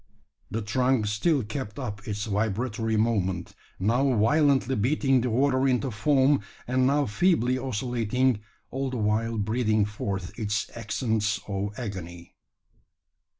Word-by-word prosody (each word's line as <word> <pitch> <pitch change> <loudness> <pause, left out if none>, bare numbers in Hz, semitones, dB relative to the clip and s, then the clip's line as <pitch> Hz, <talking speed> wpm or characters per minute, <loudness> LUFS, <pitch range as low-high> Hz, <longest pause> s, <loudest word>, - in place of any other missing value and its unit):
The 110 0 -3
trunk 125 +2 +1
still 120 +8 +1
kept 105 0 -5
up 105 -6 -6
its 105 0 -3
vibratory 110 +2 -1
movement, 95 -5 0 0.2
now 125 +7 +2
violently 135 +2 +3
beating 135 +3 +2
the 125 - -1
water 130 +2 +2
into 130 0 +1
foam, 140 +3 +3 0.3
and 130 +1 +2
now 145 +1 +2
feebly 130 - +2
oscillating, 125 -1 0 0.3
all 135 0 -2
the 130 - -4
while 110 +1 0
breathing 110 0 +1
forth 100 -1 -5
its 105 -2 -2
accents 110 -1 -1
of 100 +1 -3
agony. 85 -7 -7
115 Hz, 125 wpm, -26 LUFS, 105-130 Hz, 0.3 s, violently